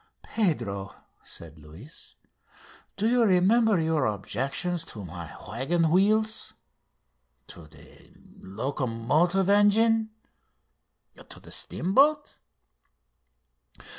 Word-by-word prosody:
"Pedro," 115 - -2 0.3
said 80 -2 -9
Luis, 80 - -13 0.8
"do 210 +2 +1
you 245 +1 +3
remember 210 +1 +3
your 160 -5 +1
objections 140 - -3
to 105 - -9
my 85 -1 -8 0.2
waggon 155 - 0
wheels?".... 215 +4 +1 1.0
"To 80 -3 -11
the - - -19 0.3
locomotive 135 - -1
engine?".... 220 +2 +3 1.2
"To - - -9
the - - -15
steamboat?" 285 - +1
165 Hz, 80 wpm, -26 LUFS, -, 1.2 s, you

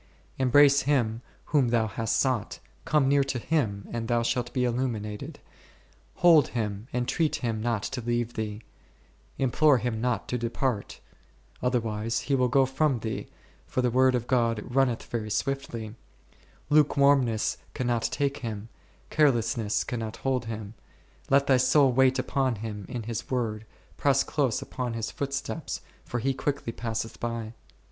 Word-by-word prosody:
Embrace 140 +2 +6
Him 115 -5 +1 0.3
whom 140 -4 +4
thou 115 -1 +2
hast 110 +1 -1
sought; 130 -6 0 0.3
come 150 -3 +3
near 140 0 +4
to 135 -2 -2
Him 115 -8 -1
and 115 -1 -3
thou 120 -1 +2
shalt 120 0 -1
be 130 - -1
illumi 125 -1 0
nated; 105 0 -7 0.8
hold 165 -6 +6
Him, 105 -2 -3
entreat 125 +6 0
Him 115 -3 -2
not 115 -3 -1
to 130 -2 -3
leave 120 0 -1
thee, 105 0 -4 0.7
im 130 -2 +1
plore 150 -2 +5
Him 110 -1 -2
not 120 -4 -1
to 125 - -1
depart; 120 -1 -2 0.6
otherwise 115 -2 -1
He 140 - -2
will 130 -2 +3
go 135 +2 +4
from 135 -2 0
thee, 110 - -4 0.4
for 130 - -1
the 125 - +2
Word 130 +1 +4
of 120 -1 -1
God 115 -3 +1
runneth 125 -2 +1
very 110 -2 -4
swiftly; 115 -3 -3 0.8
lukewarmness 140 -6 +3 0.2
cannot 120 -2 0
take 140 +3 -1
Him, 115 -4 -6 0.4
carelessness 120 -7 +2
cannot 115 -2 -4
hold 130 -3 +1
Him. 110 -2 -6 0.6
Let 140 0 +4
thy 135 -2 +4
soul 130 +2 +4
wait 130 +1 +4
upon 130 -1 0
Him 105 -2 -6
in 120 -2 -4
His 115 +1 -5
Word, 110 -4 -2 0.3
press 135 -1 +3
close 135 -7 0
upon 125 -3 -4
His 115 -1 -3
footsteps, 140 -1 -4 0.2
for 120 - -4
He 135 +4 0
quicklv 135 -3 -3
passeth 115 -1 -4
by. 115 -1 -4
120 Hz, 155 wpm, -27 LUFS, 115-135 Hz, 0.8 s, Embrace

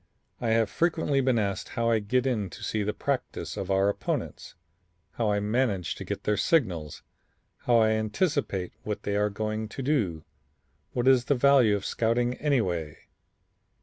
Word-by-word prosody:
"I 120 - -2
have 115 -1 +2
frequently 160 -5 +1
been 130 -2 +2
asked 100 -3 -2
how 115 0 +2
I 115 - +3
get 125 +5 0
in 110 -7 0
to - - -11
see 110 - -1
the 105 +1 0
practice - - -3
of 95 - -5
our 95 0 +3
opponents, 100 - -3 0.6
how 115 -3 -1
I 105 - +1
manage 105 -3 0
to - - -8
get - - -5
their 105 -1 +1
signals, 90 - 0 0.6
how 120 - +5
I 110 -1 +4
anticipate 110 - -1
what 105 0 -4
they 100 - -1
are 105 +1 +2
going 110 +1 -3
to 135 - -6
do, 105 - 0 0.7
what 125 +1 0
is 130 -2 +5
the 140 - +2
value 130 -5 +5
of 100 - -4
scouting 120 +2 +1
anyway. 90 - 0
110 Hz, 170 wpm, -27 LUFS, 100-125 Hz, 0.7 s, how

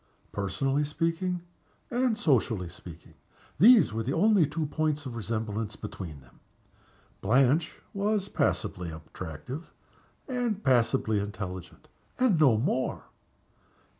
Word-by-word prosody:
Personally 135 +9 0
speaking, 165 +4 -1 0.5
and 245 -2 +1
socially 115 - +1
speaking, 85 -2 -12 0.5
these 225 - +7
were 115 - -1
the 125 +5 -2
only 205 -7 +4
points 150 0 -1
of 125 -3 -5
resemblance 110 -1 -3
between 85 -8 -7
them. 60 - -21 0.8
Blanche 135 - +3 0.2
was 200 0 0
passably 90 - -1
attractive 80 - -8 0.6
and 245 -6 -1
passably 115 -4 +2
intelligent, 95 -3 -6 0.3
and 250 -10 +3
no 135 -8 +5
more. 130 +3 -1
130 Hz, 105 wpm, -28 LUFS, 100-165 Hz, 0.8 s, these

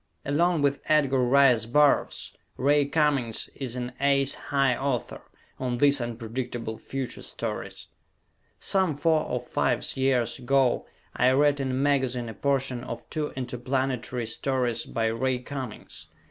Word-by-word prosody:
Along 165 +2 +2
with 140 0 +1
Edgar 140 -4 +3
Rice 125 -3 +4
Burroughs, 145 +4 +2 0.2
Ray 145 +2 +3
Cummings 140 -6 0
is 130 -3 -5
an 125 0 -4
"ace 140 -1 +3
high" 135 -3 +1
author 135 -2 -3 0.4
on 125 -2 -2
these 140 +1 +4
"unpredictable 115 -1 -4
future" 135 -2 -5
stories. - - -5 0.7
Some 190 -6 +1
four 155 +2 +2
or - - -2
fives - - 0
years 130 -2 +1
ago 130 0 +2 0.3
I 125 - +4
read 145 +1 +3
in 135 -1 -1
a - - -1
magazine 130 -3 +1
a - - -6
portion 135 0 -1
of 120 -2 -7
two 155 -2 -2
interplanetary 125 -1 -2
stories 120 0 -1
by 115 - -1
Ray 125 +3 0
Cummings. 130 -2 -8
130 Hz, 135 wpm, -26 LUFS, 120-140 Hz, 0.7 s, Rice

